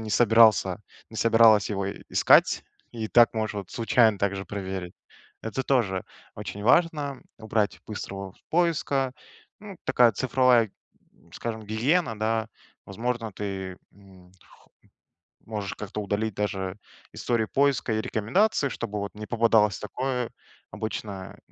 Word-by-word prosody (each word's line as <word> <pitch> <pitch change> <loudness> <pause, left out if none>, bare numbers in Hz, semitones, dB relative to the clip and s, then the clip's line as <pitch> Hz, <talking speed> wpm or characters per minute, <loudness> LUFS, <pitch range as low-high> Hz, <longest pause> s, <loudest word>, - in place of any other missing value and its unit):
не 110 -1 -6
собирался 110 -4 +4 0.3
не 110 - -10
собиралась 115 -3 +5
его 100 -1 -2
и 100 - -6
искать, - - +4 0.3
и 110 -2 -4
так 120 +1 +5
можешь 110 -1 -2
вот 100 -3 -6
случайно 115 -2 +3
также 100 -1 -1
проверить. 95 -3 -5 0.5
Это 115 +4 -3
тоже 105 -9 0 0.3
очень 100 - -7
важно- 145 0 +2 0.2
убрать 105 -5 -1
быстрого 95 -2 -6 0.2
поиска. 150 -6 +1 0.5
Ну, 205 -2 -10
такая 120 -2 +5
цифровая, 125 -2 +3 0.4
м, - - -26
скажем, 110 -2 -5
гигиена, 115 - +1
да. 110 +1 0 0.4
Возможно, 115 +2 -3
ты, 95 -2 -5 0.2
м, 95 -2 -19
х - - -22 0.8
можешь 105 -3 -5
как-то 105 +1 -5
удалить 105 +2 -2
даже 100 -1 -3 0.3
истории 115 -2 0
поиска 135 -2 +1
и 110 - 0
рекомендации, 140 - +1
чтобы 105 -5 -4
вот 100 - -5
не 105 0 -8
попадалось 110 -4 +3
такое. 125 +2 -3 0.4
Обычно 100 -3 -6
110 Hz, 130 wpm, -26 LUFS, 100-120 Hz, 0.8 s, собиралась